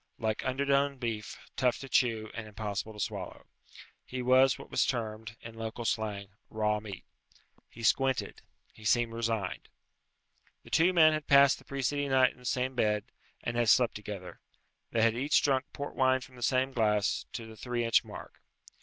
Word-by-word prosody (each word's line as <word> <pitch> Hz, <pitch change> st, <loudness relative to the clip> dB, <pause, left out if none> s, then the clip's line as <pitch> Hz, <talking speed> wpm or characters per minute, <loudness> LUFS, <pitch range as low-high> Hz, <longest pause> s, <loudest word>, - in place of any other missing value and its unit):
Like 110 Hz, -2 st, -2 dB
underdone 140 Hz, +1 st, +1 dB
beef, 115 Hz, -4 st, -4 dB, 0.2 s
tough 125 Hz, -1 st, +2 dB
to 135 Hz, -, -8 dB
chew, 115 Hz, -4 st, +1 dB
and 115 Hz, -1 st, -6 dB
impossible 105 Hz, 0 st, -4 dB
to 105 Hz, -, -12 dB
swallow. -, -, -5 dB, 0.6 s
He 130 Hz, 0 st, -5 dB
was 130 Hz, +1 st, +5 dB
what -, -, -12 dB
was -, -, +3 dB
termed, 110 Hz, -2 st, -3 dB
in 115 Hz, -, -9 dB
local 115 Hz, +1 st, -6 dB
slang, 105 Hz, -2 st, -2 dB, 0.2 s
raw 105 Hz, -1 st, 0 dB
meat. 105 Hz, -3 st, -9 dB, 0.6 s
He 115 Hz, -, -11 dB
squinted. 130 Hz, +3 st, +1 dB, 0.3 s
He 110 Hz, -, -16 dB
seemed 115 Hz, +2 st, +2 dB
resigned. 115 Hz, -5 st, -2 dB, 0.9 s
The -, -, -15 dB
two 175 Hz, +3 st, +4 dB
men 160 Hz, -3 st, +6 dB
had 155 Hz, -1 st, -3 dB
passed 140 Hz, 0 st, +6 dB
the -, -, -19 dB
preceding 140 Hz, +1 st, -1 dB
night 130 Hz, -1 st, +4 dB
in -, -, -22 dB
the 125 Hz, -, -16 dB
same 130 Hz, +1 st, 0 dB
bed, 105 Hz, -2 st, 0 dB, 0.3 s
and 120 Hz, -, -3 dB
had 120 Hz, -2 st, +2 dB
slept 125 Hz, 0 st, +5 dB
together. 100 Hz, -3 st, -8 dB, 0.5 s
They 115 Hz, -, +1 dB
had 115 Hz, -1 st, +4 dB
each 140 Hz, +4 st, +3 dB
drunk 135 Hz, -1 st, +2 dB
port 145 Hz, -, -6 dB
wine 130 Hz, 0 st, +3 dB
from 130 Hz, 0 st, -12 dB
the 120 Hz, -, -13 dB
same 130 Hz, +2 st, +1 dB
glass, 105 Hz, -4 st, +1 dB
to 115 Hz, -, -5 dB
the 110 Hz, 0 st, -11 dB
three 120 Hz, +1 st, -2 dB
inch 115 Hz, -, +4 dB
mark. -, -, -11 dB
120 Hz, 180 wpm, -30 LUFS, 110-130 Hz, 0.9 s, men